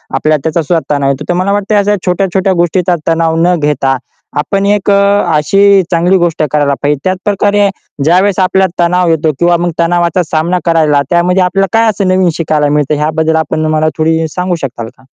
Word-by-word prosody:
आपल्या 155 0 +1
त्याचा 160 +1 -1
सुद्धा 160 -1 -1
तणाव 140 -1 0
येतो, 140 +2 -3
तर - - +2
मला 185 +3 -1
वाटते 205 +1 -1
अशा 205 0 +2
छोट्या-छोट्या 190 +1 0
गोष्टीचा 175 +1 0
तणाव 165 0 +1
न 180 - +2
घेता 140 -3 0 0.4
आपण 195 +6 -1
एक 205 -1 0
अ, - - +4 0.4
अशी 195 +5 +3
चांगली 175 +3 +2
गोष्ट 170 -3 -1
करायला 145 -2 +1
पाहिजे. 145 -1 0
त्याचप्रकारे 200 +2 0 0.3
ज्यावेळेस 185 +5 +2
आपल्याला 185 -1 +1
तणाव 180 0 +1
येतो 160 -1 +1
किंवा 175 0 +2
मग 175 0 -2
तणावाचा 175 +1 +1
सामना 165 +3 -1
करायला 155 -4 +2
त्यामध्ये 180 +1 +2
आपल्याला 195 +2 0
काय 225 0 +3
असं 200 -2 -1
नवीन 185 -1 +2
शिकायला 150 -3 0
मिळतं 150 0 0
ह्याबद्दल 160 +2 -1
आपण 155 0 -1
मला 155 0 +1
थोडी 160 0 0
सांगू 180 -1 -2
शकाल 120 -4 -5
का? 130 - -23
175 Hz, 185 wpm, -11 LUFS, 155-190 Hz, 0.4 s, अ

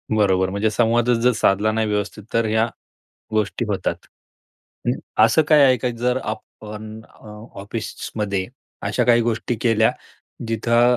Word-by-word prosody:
बरोबर. 95 -3 +2
म्हणजे 100 +3 0
संवादच 120 +2 +2
जर 125 +1 +4
साधला 105 0 +2
नाही 110 0 0
व्यवस्थित 105 0 -3
तर 115 0 +2
ह्या 110 +1 +2 0.6
गोष्टी 110 -1 -1
होतात. - - -1 0.9
हं. - - 0 0.3
असं 115 +8 +4
काय 150 -2 +7
आहे 130 -1 +5
का 125 - -1
जर 125 +2 +1
आपण 110 0 -7
अ, 110 - -20 0.3
ऑफिसमध्ये 100 -2 -4 0.4
अशा 125 - 0
काही 120 0 +5
गोष्टी 115 +1 -1
केल्या 115 -2 +3 0.6
जिथं 120 +2 +3
110 Hz, 135 wpm, -21 LUFS, 105-120 Hz, 0.9 s, काय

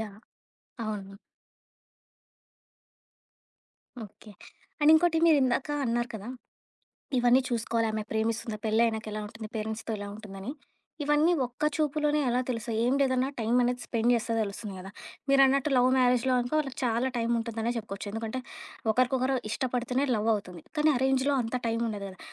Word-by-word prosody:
Yeah! 210 -1 -7 0.6
అవును. 200 -2 -5 2.9
Okay. 210 +1 -15 0.5
And 295 +1 +6
ఇంకోటి, 325 +1 +4
మీరిందాక 275 -3 +3
అన్నారు 240 0 0
కదా! 215 +1 -6 0.9
ఇవన్నీ 245 +1 +5
చూసుకోవాలి 230 -1 0
ఆమె 215 0 -2
ప్రేమిస్తుంది. 220 0 -1
పెళ్ళ 220 +1 +2
ఆయనకి 220 -1 -3
ఎలా 215 - -3
ఉంటుంది? 220 0 -8
పేరెంట్స్‌తో 220 +1 -3
ఎలా 205 - -6
ఉంటుందని. 205 0 -8 0.5
ఇవన్నీ 295 +4 +3
ఒక్క 245 +4 -9
చూపులోనే 300 -1 +1
ఎలా 245 +1 +2
తెలుసయి 230 -2 -2
ఏం 250 +2 +2
లేదన్నా 260 -1 +2
టైం 225 +1 -1
అనేది 245 +1 0
స్పెండ్ 235 0 +1
చేస్తే 230 0 -1
తెలుస్తుంది 200 0 -5
గదా! 190 +1 -9 0.4
మీరన్నట్టు 275 +1 +4
లవ్ 250 0 +5
మ్యారేజ్‌లో 250 0 +3
అనుకో 245 +4 -3
వాళ్ళకి 270 -3 -6
చాలా 240 +2 +1
టైం 230 -1 0
ఉంటుందనే 230 0 -2
చెప్పుకోవచ్చు. 210 -3 -5
ఎందుకంటే, 225 +3 -3 0.5
ఒకరికొకరు 255 +2 +2
ఇష్టపడితేనే 250 +3 -1
లవ్ 215 0 0
అవుతుంది. 180 -5 -6 0.2
కానీ 305 +1 +4
అరేంజ్‌లో 265 +2 +2
అంత 225 +1 -5
టైం 230 0 0
ఉండదు 205 -2 -4
గదా! 185 -1 -12
235 Hz, 140 wpm, -28 LUFS, 220-260 Hz, 2.9 s, And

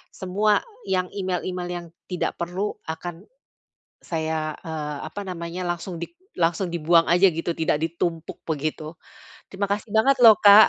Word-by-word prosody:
semua 205 +3 +2 0.2
yang 185 -1 0
email-email 185 -2 -2
yang 175 -1 -4 0.2
tidak 180 -2 -2
perlu 180 +4 -2
akan 165 +2 -6 0.8
saya, 160 -2 -2
eee, 150 -2 -4
apa 205 +6 -6
namanya 175 0 -4
langsung 175 +1 -3
dik 340 - -7 0.2
langsung 170 +2 +1
dibuang 165 0 +3
aja 180 +3 +6
begitu, 165 +1 -3
tidak 160 -1 +1
ditumpuk 165 0 -3
begitu. 155 +1 -3 0.5
Terima 200 +1 -3
kasih 205 +2 -1
banget 265 +5 +4
loh 225 -3 +10
Kak, 205 +1 +10
175 Hz, 140 wpm, -24 LUFS, 165-190 Hz, 0.8 s, loh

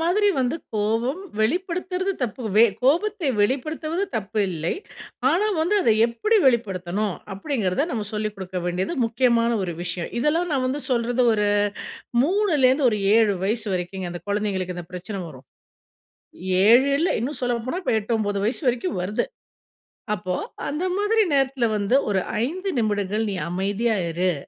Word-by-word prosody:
மாதிரி 390 +5 +3
வந்து 255 +5 +1 0.2
கோவம் 225 - 0 0.2
வெளிப்படுத்துறது 365 - -1
தப்பு. 240 0 -3
வே 225 - +8 0.2
கோபத்தை 345 +3 +2
வெளிப்படுத்துவது 310 - 0
தப்பு 215 0 -3
இல்லை. 165 -1 -2 0.6
ஆனா 370 +7 +2
வந்து 345 +6 +2
அதை 225 - +4
எப்படி 240 - +1
வெளிப்படுத்தணும்? 200 -4 0 0.2
அப்படிங்கிறத, 220 +1 -1
நம்ம 215 -3 -2
சொல்லிக் 215 0 -2
கொடுக்க 190 -1 -5
வேண்டியது 180 - -1
முக்கியமான 230 0 +2
ஒரு 175 - -2
விஷயம். 175 0 -3
இதெல்லாம் 325 +7 +1
நான் 265 -2 +1
வந்து 270 +3 -2
சொல்றது 245 +1 +1
ஒரு, 210 -1 +1 0.7
3லேந்து 300 -7 +3
ஒரு 210 - -1 0.2
7 220 -3 +4
வயசு 215 +2 -1
வரைக்குங்க 180 +1 -4
அந்த 175 - -6
குழந்தைகளுக்கு 195 -3 -1
இந்த 175 - -7
பிரச்சனை 190 +2 -5
வரும். 130 -3 -13 1.2
7 250 +5 +6
இல்ல 350 - +2
இன்னும் 280 +5 -3
சொல்ல 245 -1 +1
போனா, 360 +8 -2
இப்போ 245 - +1
8, 215 +3 -3
9 205 -2 -1
வயசு 235 - 0
வரைக்கும் 205 -6 -2
வருது. 205 - -1 0.9
அப்போ 180 -1 -3 0.3
அந்த 300 +5 -3
மாதிரி 435 +2 +2
நேரத்தில 270 -2 +1
வந்து 205 +5 +1
ஒரு 195 - +2 0.3
5 370 +7 -4
நிமிடங்கள் 210 0 0
நீ - - -3 0.2
அமைதியா 200 +5 0 0.2
இரு. 180 +1 +1
230 Hz, 145 wpm, -23 LUFS, 200-295 Hz, 1.2 s, வே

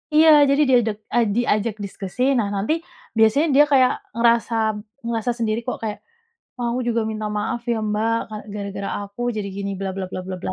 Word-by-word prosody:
Iya, 315 +1 +7 0.2
jadi 280 +2 +3
diadek 230 -5 +3 0.2
ah, 240 -1 +4
diajak 225 -2 +1
diskusi. 195 +3 -7 0.2
Nah 220 -4 +1
nanti, 200 +9 0 0.4
biasanya 225 +8 +4
dia 290 - +8
kayak 260 -2 +5 0.3
ngerasa 235 0 +3 0.5
ngerasa 230 +1 -1
sendiri 225 -1 0
kok, 250 - -3
kayak, 210 -1 -3 0.6
"Wah 245 - -2
aku 245 - -1
juga 230 -1 +1
minta 215 -1 -4
maaf 220 +3 -2
ya 230 - +1
Mbak, 220 +2 +1
ka 215 - -7 0.2
gara-gara 200 -1 -4
aku 200 +3 -9
jadi 210 -2 -3
gini," 200 0 -3
bla 195 -1 -2
bla 195 -1 -3
bla - - -4
bla 185 0 -4
bla. - - -3
225 Hz, 190 wpm, -22 LUFS, 205-240 Hz, 0.6 s, dia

